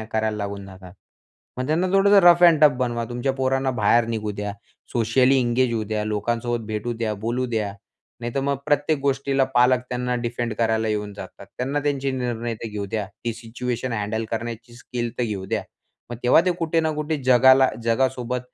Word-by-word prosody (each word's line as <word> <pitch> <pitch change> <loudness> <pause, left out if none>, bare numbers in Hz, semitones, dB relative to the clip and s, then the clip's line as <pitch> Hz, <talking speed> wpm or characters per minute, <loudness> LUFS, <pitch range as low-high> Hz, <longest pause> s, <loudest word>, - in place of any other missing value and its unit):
ऍ - - -4
ऍ - - -7
करायला 110 -1 0
लागून 100 -1 -5
जातात. 95 -1 -12 0.7
मग 130 - -2
त्यांना 160 +5 +1
थोडंसं 200 +1 +5
रफ 175 0 +7
एंड 170 -4 +7
टफ 150 - +8
बनवा. 120 -2 -1
तुमच्या 120 +2 -1
पोरांना 135 0 0
बाहेर 115 0 +3
निघू 110 -2 -2
द्या. 105 0 -4 0.4
सोशली 125 +3 +3
एंगेज 125 0 +1
होऊ 110 - -1
द्या. 105 0 -2
लोकांसोबत 115 +2 -2
भेटू 110 +2 -3
द्या. 115 -2 -2
बोलू 125 +2 -1
द्या. 110 -4 -2 0.5
नाहीतर 120 +3 -2
मग 140 0 0
प्रत्येक 145 +1 +1
गोष्टीला 135 0 +1
पालक 125 +1 +4
त्यांना 125 0 -2
डिफेंड 120 -1 -2
करायला 110 -1 0
येऊन 105 -1 -2
जातात. 100 0 -10
त्यांना 135 +4 -1
त्यांचे 140 -1 -1
निर्णय 120 -2 -3
तर - - -3
घेऊ 105 -1 -4
द्या. 105 -1 -3 0.2
ती 115 - -1
सिच्युएशन 120 +2 -4
हँडल 110 +1 -2
करण्याची 120 +1 -5
स्किल 120 -1 -4
तर - - +1
घेऊ 100 -4 -4
द्या. - - -1 0.5
मग 120 - -5
तेव्हा 125 +6 +6
ते - - +4
कुठे 165 0 +1
ना 160 - 0
कुठे 150 +1 -2
जगाला, 130 +1 +6 0.2
जगासोबत 125 +1 0
120 Hz, 190 wpm, -23 LUFS, 110-130 Hz, 0.7 s, टफ